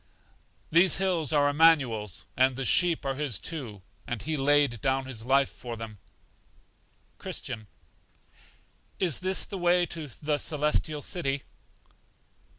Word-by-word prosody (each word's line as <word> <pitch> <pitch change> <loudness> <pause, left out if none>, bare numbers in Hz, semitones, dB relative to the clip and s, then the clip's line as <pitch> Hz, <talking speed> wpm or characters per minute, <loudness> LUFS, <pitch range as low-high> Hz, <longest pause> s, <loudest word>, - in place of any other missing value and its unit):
These 175 +3 +5
hills 180 -6 0
are 145 -2 +3
Immanuel's, 140 - +3
and 130 0 +3
the 135 +1 -3
sheep 175 0 +3
are 135 - 0
His 135 -6 -2
too, 110 - -6 0.2
and 120 - -3
He 155 +8 -3
laid 145 -4 +2
down 135 0 0
his 120 -4 -6
life 135 +1 +3
for 120 -2 -8
them. 110 -2 -8 1.2
Christian. 110 -1 -6 1.3
Is 175 -7 +2
this 185 0 0
the 195 - -6
way 175 0 +3
to 160 -3 -6
The 145 +3 -3
Celestial 150 -1 -1
City? 140 -6 -2
145 Hz, 130 wpm, -28 LUFS, 125-165 Hz, 1.3 s, These